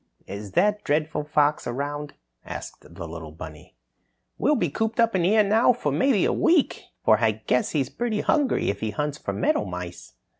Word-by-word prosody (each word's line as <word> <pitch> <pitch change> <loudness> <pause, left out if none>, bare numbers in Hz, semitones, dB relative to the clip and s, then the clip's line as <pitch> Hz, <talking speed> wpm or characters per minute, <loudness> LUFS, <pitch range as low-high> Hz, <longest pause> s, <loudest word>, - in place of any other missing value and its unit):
"Is 100 0 -8
that 205 +3 +2
dreadful 150 0 0
fox 150 0 +1
around?" 145 +4 -4 0.3
asked - - -8
the 85 - -6
little 80 -1 -8
bunny. 80 -1 -11 0.6
"We'll 295 +6 +3
be 175 - 0
cooped 225 +6 -2
up 230 -3 +3
here 195 +5 +4
now 220 +5 +4
for 150 -11 -2
maybe 195 - +2
a - - +1
week, 330 -4 +2 0.2
for 110 -1 +5
I 110 -2 +3
guess 110 +4 0
he's 140 -5 0
pretty 230 -3 -1
hungry 285 - +1
if 100 - -8
he 110 - -2
hunts 150 +4 -3
for - - -3
meadowmice." 90 -3 -2
150 Hz, 175 wpm, -25 LUFS, -, 0.6 s, for